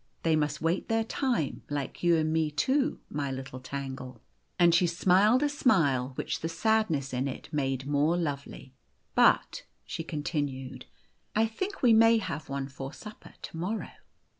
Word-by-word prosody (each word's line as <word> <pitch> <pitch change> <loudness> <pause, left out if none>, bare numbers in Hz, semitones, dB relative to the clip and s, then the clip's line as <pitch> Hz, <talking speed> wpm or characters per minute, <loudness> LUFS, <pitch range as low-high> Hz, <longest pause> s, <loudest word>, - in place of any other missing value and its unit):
" - - -41
They 165 -1 +3
must 150 0 -1
wait 165 +3 0
their 225 0 +2
time, 235 - -1
like 145 -2 -4
you 175 -1 +4
and 155 0 0
me 160 -1 +1
too, 265 - +1
my 145 -1 -3
little 130 -1 -6
Tangle." 130 -2 -6 0.4
And 175 -1 +5
she 175 +1 +4
smiled 195 - +4
a - - +3
smile 155 - +2
which - - -3
the 165 - -3
sadness 165 - +1
in 130 +2 0
it 135 +4 -7
made 135 -3 -1
more 145 +4 +2
lovely. 140 -4 -4 0.2
" - - -44
But," - - +3 0.2
she 165 - -5
continued, 145 -4 -4 0.3
" - - -42
I 220 +1 +4
think 375 - -5
we 240 -2 +6
may 225 +1 +6
have 155 -9 -4
one 135 0 -3
for 135 0 -7
supper 210 0 -12
to - - -7
morrow." 190 +7 -3
160 Hz, 175 wpm, -29 LUFS, 140-215 Hz, 0.4 s, we